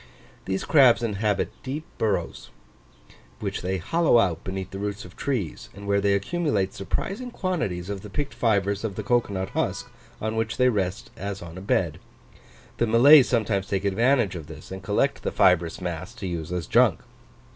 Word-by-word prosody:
These 95 0 -2
crabs 130 -6 +5
inhabit 105 -2 0
deep 145 +4 -5
burrows, 95 -6 -1 0.9
which - - -3
they 95 +1 -1
hollow 165 - +3
out 90 -8 +1
beneath 95 0 -5
the 95 - -6
roots 105 0 -4
of 90 - -13
trees; 120 - -3
and 100 +1 -10
where 100 0 +2
they 100 0 +3
accumulate 100 - 0
surprising 200 - -3
quantities 155 - -2
of 100 -1 -4
the 105 - -9
picked 145 +7 -3
fibres 100 -3 +1
of 105 -4 -3
the 105 - -4
cocoa 120 0 +1
nut 95 0 -3
husk, - - -2 0.3
on 110 +1 -2
which 115 0 -1
they 125 0 +4
rest 95 -4 -2
as 100 -1 -5
on 85 -1 -9
a 90 - -7
bed. 100 - 0 0.8
The 120 - +1
Malays 130 +5 +7
sometimes 105 -5 0
take 100 0 -1
advantage 115 +2 +2
of 80 -5 -7
this, 80 +1 -11
and 95 0 -6
collect 105 +9 0
the - - -2
fibrous 85 -3 +3
mass 90 +5 -5
to 110 - -7
use 85 -3 -4
as 90 -2 -2
junk. - - +3
100 Hz, 180 wpm, -25 LUFS, 95-120 Hz, 0.9 s, Malays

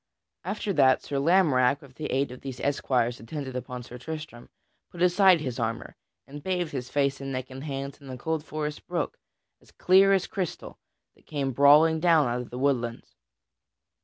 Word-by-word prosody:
After 200 +2 -3
that, 130 -6 +4
Sir 140 - -3
Lamorack, 140 -5 +3
with 135 -2 -15
the 150 +3 -5
aid 135 0 -1
of 125 - -10
these 130 -2 -7
esquires 125 -4 0
attendant 130 +2 -6
upon 125 0 -5
Sir 125 +1 -10
Tristram, 155 -3 -8 0.4
put 175 - -12
aside 180 -1 +5
his 130 -4 -4
armor, 115 0 -3 0.3
and 145 +2 -10
bathed 180 -2 -2
his 130 -2 -5
face 140 -1 0
and 135 0 -5
neck 130 0 -5
and 135 +1 -8
hands 140 -1 -5
in 140 - -12
a 130 - -6
cold 160 +3 -2
forest 150 -1 -5
brook, 175 -3 -3 0.4
as - - -23
clear 190 +2 +4
as 190 -2 +2
crystal, 190 -6 -5 0.3
that - - -28
came 140 -3 -2
brawling 150 +5 +5
down 160 -4 +4
out 120 +1 -1
of 125 - -9
the 125 - -7
woodlands. 125 -3 -1
140 Hz, 185 wpm, -27 LUFS, 130-160 Hz, 0.4 s, aside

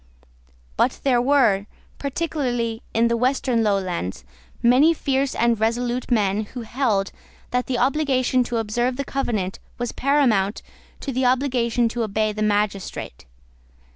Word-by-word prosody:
But - - +1
there 250 -3 +3
were, 240 -7 +3 0.3
particularly 255 -6 -2
in 230 +1 +3
the 235 - +1
western 250 -1 +1
lowlands, 185 - -1 0.4
many 270 +8 +5
fierce 275 -2 0
and 235 -1 +2
resolute 240 +2 -1
men 210 -3 +1
who 245 +4 -8
held 220 -5 0 0.4
that 250 0 0
the 255 - -1
obligation 255 -1 +2
to 240 -1 -2
observe 240 +3 0
the 280 - -3
Covenant 215 -10 -2 0.2
was 240 -1 -3
paramount 245 -8 +1 0.4
to 275 - -3
the 260 0 0
obligation 245 -2 +2
to 235 +1 -3
obey 215 0 0
the 215 - -5
magistrate. 205 - -2
240 Hz, 135 wpm, -23 LUFS, 215-260 Hz, 0.4 s, many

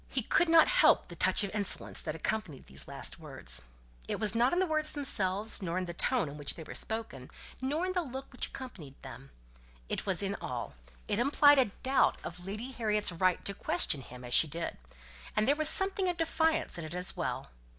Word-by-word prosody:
He 255 - -2
could 335 +9 +1
not 325 -1 +6
help - - +3
the - - -9
touch - - +2
of 200 - -5
insolence 205 -2 0
that 155 - -5
accompanied 165 -4 -4
these - - -8
last 140 +4 -7
words. 130 - -1 0.5
It - - -3
was 215 -2 +3
not 235 +2 +2
in 350 - 0
the 375 - +2
words 310 -2 0
themselves, 210 -8 +3
nor 175 -1 -3
in 185 - -2
the 175 - -7
tone 245 +2 0
in 140 +1 -9
which 145 - 0
they 165 - -9
were - - -10
spoken, 220 - -5 0.3
nor 295 +7 -1
in 370 - -3
the 360 - 0
look 265 -3 -8
which 250 - -2
accompanied 170 - -10
them, 135 +1 -11 0.6
it - - -4
was 190 0 +1
in 200 0 -2
all; 120 - -5 0.3
it 205 - -1
implied 285 +2 +5
a 260 - +4 0.2
doubt 265 +1 +2
of 175 +1 -8
Lady 215 +7 -6
Harriet's 210 -5 -1
right 180 +1 0
to 200 - -3
question 165 -6 +3
him 125 0 -12
as 120 - -5
she 160 - +5
did; 165 +3 -5 0.6
and 215 - +1
there 285 - +3
was 310 0 +4
something 385 -1 +5
of 350 - -3
defiance 320 - 0
in - - -6
it 155 +2 -7
as 180 +1 -1
well. - - -4
210 Hz, 215 wpm, -30 LUFS, -, 0.6 s, not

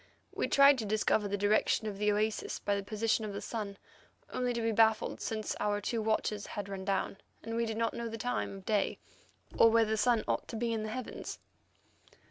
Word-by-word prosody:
We - - -1
tried 275 -1 +6
to 220 - -2
discover 210 0 +1
the 205 0 -1
direction 205 +2 +2
of 205 -2 -4
the 210 0 +3
oasis 215 +1 -1
by 205 - -1
the 200 - -1
position 215 +2 0
of 210 -2 -4
the 200 - -4
sun, 205 -4 -4 0.6
only 250 -1 0
to 235 -1 -2
be 225 - +2
baffled, 220 0 +2
since 215 -1 -2
our 205 0 +1
two 225 +3 -2
watches 215 -1 -1
had 205 -1 -5
run 195 -1 -5
down, 195 0 -1 0.3
and 225 0 -4
we 230 0 0
did 220 0 -3
not 230 0 0
know 235 -1 -4
the 225 - -5
time 245 -4 -2
of 190 - -13
day 210 -2 +1 0.6
or 230 - +8
where 225 0 +4
the 220 0 0
sun 235 0 +3
ought - - -1
to - - -7
be 230 +1 -1
in 220 - -1
the 215 - -4
heavens. 250 +2 -5
215 Hz, 220 wpm, -32 LUFS, 205-230 Hz, 0.6 s, or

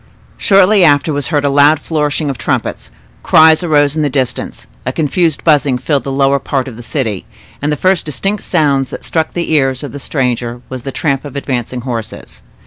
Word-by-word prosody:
Shortly 195 0 +4
after 150 0 +3
was 145 -1 -2
heard 145 -3 0
a - - +3
loud 145 +2 +4
flourish 150 -1 -1
of 140 -3 -2
trumpets; - - -2 0.3
cries 160 +1 +5
arose 145 -4 +2
in 155 - 0
the 145 - +1
distance, 130 - -3 0.2
a 130 - -2
confused 160 +2 0
buzzing 145 -5 +3
filled 140 +2 -1
the 135 - -3
lower 135 0 +2
part 135 0 -2
of 125 - -8
the 120 - -10
city, 115 -6 -3 0.3
and 145 +1 0
the 150 - -1
first 185 +1 +1
distinct 195 +8 -2
sound 140 -6 +1
that - - -8
struck 160 -1 -1
the 170 -2 -3
ears 135 -4 +1
of 145 - -6
the 145 - -7
stranger 120 -3 -2
was 130 -1 -6
the 135 - -5
tramp 135 -1 -1
of 145 -2 -9
advancing 125 -3 -3
horses. 115 -3 -6
145 Hz, 200 wpm, -14 LUFS, 130-155 Hz, 0.3 s, cries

